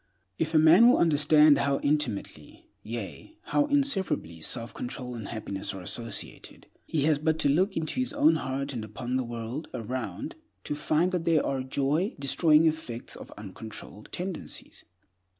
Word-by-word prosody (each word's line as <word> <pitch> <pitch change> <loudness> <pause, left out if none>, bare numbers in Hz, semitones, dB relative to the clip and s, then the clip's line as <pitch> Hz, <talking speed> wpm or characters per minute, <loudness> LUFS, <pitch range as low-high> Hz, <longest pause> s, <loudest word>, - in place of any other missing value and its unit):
If 160 +1 -1
a - - +7
man 165 +9 +7
will 250 - +5
understand 150 -2 +5
how 140 0 +1
intimately, 145 -8 -2 0.2
yea, 115 - -7
how 290 - +1
inseparably, 200 - +1
self 115 +7 -2
control 125 0 -5
and 110 -4 -6
happiness 100 -3 -4
are 95 - -7
associated, 115 +5 -6 0.2
he 150 -3 0
has 150 -1 +3
but 160 +1 +1
to 145 - +2
look 185 +7 +2
into 160 +10 -2
his 255 - +1
own 295 +3 +4
heart, 135 +1 -3
and 115 -3 -4
upon 120 +4 -4
the 130 - +1
world 120 +5 -5
around, 125 - -4 0.3
to - - -3
find 155 +4 +1
there 165 -4 +2
the 135 -1 -2
joy 150 - 0
destroying 150 +3 +4
effects 155 -7 -2
of - - -11
uncontrolled 105 +1 -9
tendencies. 180 -1 -6
145 Hz, 155 wpm, -28 LUFS, 120-165 Hz, 0.3 s, a